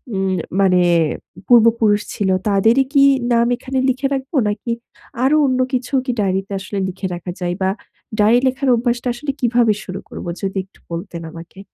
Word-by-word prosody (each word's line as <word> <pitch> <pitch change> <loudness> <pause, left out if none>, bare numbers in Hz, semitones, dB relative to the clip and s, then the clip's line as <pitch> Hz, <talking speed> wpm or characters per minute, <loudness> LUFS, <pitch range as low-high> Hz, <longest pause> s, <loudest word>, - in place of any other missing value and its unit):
উম 190 -1 0 0.3
মানে 185 -2 +4 0.7
পূর্বপুরুষ 225 -3 +4
ছিল 200 -2 -1 0.2
তাদেরই 225 +6 +4
কি 280 -2 +6 0.3
নাম 235 0 +3
এখানে 265 +1 -5
লিখে 260 +2 0
রাখব? 270 +2 -4
নাকি 210 +3 -3 0.5
আরো 275 +3 +4
অন্য 255 -1 +1
কিছু 255 +2 -2
কি 255 - 0
ডায়েরিতে 195 0 -1
আসলে 190 +1 -6
লিখে 190 +1 -4
রাখা 175 +1 -6
যায়? 175 -1 -2
বা 190 - +2 0.5
ডায়রি 220 +4 +5
লেখার 260 +1 0
অভ্যাসটা 240 +1 -1
আসলে 275 +4 -4
কিভাবে 240 -3 +3
শুরু 185 0 -6
করব? - - -8 0.2
যদি 195 -1 -3
একটু 190 - -27
বলতেন 170 0 -5
আমাকে? 170 +3 -12
220 Hz, 165 wpm, -19 LUFS, 190-250 Hz, 0.7 s, কি